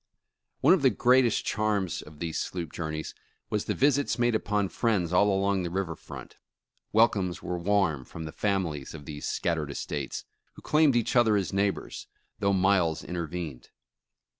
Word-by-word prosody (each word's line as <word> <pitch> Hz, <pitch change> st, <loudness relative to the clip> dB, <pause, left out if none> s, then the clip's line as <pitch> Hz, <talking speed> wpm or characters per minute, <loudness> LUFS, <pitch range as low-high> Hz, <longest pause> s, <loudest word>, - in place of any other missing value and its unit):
One -, -, +6 dB
of 185 Hz, -, +2 dB
the 135 Hz, -, +6 dB
greatest 125 Hz, +1 st, +3 dB
charms 105 Hz, -4 st, 0 dB
of 75 Hz, 0 st, -13 dB
these 80 Hz, 0 st, -3 dB
sloop 85 Hz, -4 st, -4 dB
journeys 80 Hz, -2 st, -4 dB, 0.4 s
was 105 Hz, -, -1 dB
the -, -, -1 dB
visits 145 Hz, 0 st, +2 dB
made 120 Hz, -1 st, +2 dB
upon 105 Hz, -3 st, 0 dB
friends 95 Hz, -8 st, 0 dB
all 100 Hz, +3 st, +5 dB
along 100 Hz, 0 st, +1 dB
the 85 Hz, -, -3 dB
river 90 Hz, -2 st, -2 dB
front. -, -, -11 dB, 0.5 s
Welcomes 105 Hz, -5 st, +2 dB
were 90 Hz, 0 st, -3 dB
warm 85 Hz, -7 st, +1 dB
from 80 Hz, -, -8 dB
the 80 Hz, -, -6 dB
families 85 Hz, -10 st, -2 dB
of 75 Hz, -2 st, -10 dB
these 75 Hz, 0 st, -6 dB
scattered 80 Hz, -4 st, -1 dB
estates, 70 Hz, 0 st, -4 dB, 0.3 s
who -, -, -15 dB
claimed 150 Hz, -4 st, +4 dB
each 115 Hz, 0 st, +1 dB
other 115 Hz, -3 st, +5 dB
as 95 Hz, -5 st, -2 dB
neighbors, 100 Hz, 0 st, -1 dB, 0.3 s
though 100 Hz, -2 st, +2 dB
miles 95 Hz, -4 st, +2 dB
intervened. 85 Hz, -5 st, -5 dB
95 Hz, 165 wpm, -28 LUFS, 80-105 Hz, 0.5 s, One